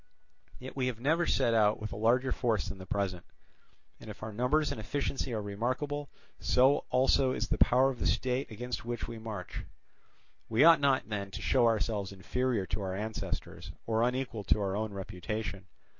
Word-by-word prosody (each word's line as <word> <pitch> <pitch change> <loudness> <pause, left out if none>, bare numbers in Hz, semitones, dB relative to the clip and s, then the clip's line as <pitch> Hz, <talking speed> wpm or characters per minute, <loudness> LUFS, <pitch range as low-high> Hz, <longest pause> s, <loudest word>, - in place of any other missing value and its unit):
Yet 130 +1 -9
we 130 -2 0
have 120 -3 -3
never 160 +7 +2
set 115 - +2
out 105 -2 +3
with 110 -1 -5
a - - -5
larger 120 +5 +2
force 115 -7 0
than 100 -2 -7
the 95 - -9
present; 95 -3 -2 0.8
and - - -11
if 105 +1 -9
our 110 0 -5
numbers 135 +7 +1
and 110 - -4
efficiency 135 +2 -2
are 110 -2 -2
remarkable, 130 +8 -2 0.3
so 130 +3 +3
also 130 0 +3
is - - -2
the - - 0
power 130 +2 +5
of 125 - -9
the - - 0
state 125 +5 0
against 120 +3 -5
which 120 0 -4
we 115 -1 -7
march. 110 -5 -6 0.9
We 115 +5 +4
ought 165 0 +8
not 140 -2 +2
then 100 -2 -3
to 95 - -7
show 125 -3 +4
ourselves 105 -3 0
inferior 115 +2 -1
to 105 - -3
our 95 -1 -3
ancestors, 110 +2 -5
or 110 0 +1
unequal 125 -3 -1
to - - +3
our 100 -1 -1
own 110 0 -2
reputation. 100 +1 -5
115 Hz, 190 wpm, -31 LUFS, 105-130 Hz, 0.9 s, ought